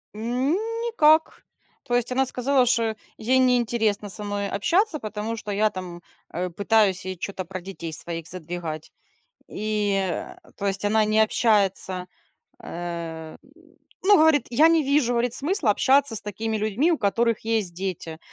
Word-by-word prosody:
Н 245 +5 -1 0.3
никак. 320 -9 +3 0.4
То 245 - -1
есть 245 0 0
она 265 +1 +2
сказала, 255 +1 +1
что 230 -2 +1 0.2
ей 255 +4 +2
не 250 -1 +4
интересно 220 -3 0
со 210 +2 -7
мной 205 -1 -3
общаться, 330 - +1
потому 215 +1 -4
что 210 - -6
я 210 +2 +2
там, 180 -3 -8 0.3
э, 180 +1 -2
пытаюсь 200 0 +2
ей 185 0 -4
чё-то 185 +1 -5
про 185 +1 -7
детей 170 -3 -7
своих 165 +1 -6
задвигать. 165 -3 -6 0.6
И, 210 -1 -1
а, 190 -2 -3 0.2
то 200 - -4
есть 195 0 -2
она 215 +1 +3
не 215 +1 +2
общается, 195 -4 +1 0.6
э, 165 -2 -6 0.7
ну 405 +2 +6
говорит: 315 -2 +4
"Я 295 +7 +5
не 330 -1 +3
вижу", 275 -3 +2
говорит, 240 0 0
"Смысла 295 - +1
общаться 265 +1 +3
с 210 - -4
такими 220 +2 -3
людьми, 215 - +1
у 330 - +1
которых 230 +1 +1 0.2
есть 190 -5 -4
дети. 170 -3 -5
215 Hz, 155 wpm, -24 LUFS, 190-250 Hz, 0.7 s, ну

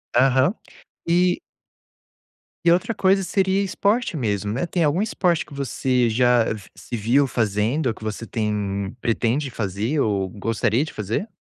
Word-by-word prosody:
Aham. 130 +6 +4 0.5
E 175 +1 +3 1.3
E 170 - +6
outra 185 +6 +1
coisa 195 0 +3
seria 190 +1 +1
esporte 200 +2 0
mesmo, 105 -6 -1
né. 135 +9 -1
Tem 170 -1 0
algum 150 +6 +1
esporte 180 -6 +1
que - - -14
você 130 -2 0
já 120 0 +3 0.3
se - - -7
viu 120 +6 +2
fazendo 115 +5 0
ou 115 - +1
que 110 - -14
você 110 +1 -4
tem, 100 -3 -2
pretende 120 +4 0
fazer 110 +6 -2
ou 100 -6 0
gostaria 115 +6 0
de - - -9
fazer? 110 - -3
125 Hz, 145 wpm, -22 LUFS, 110-170 Hz, 1.3 s, E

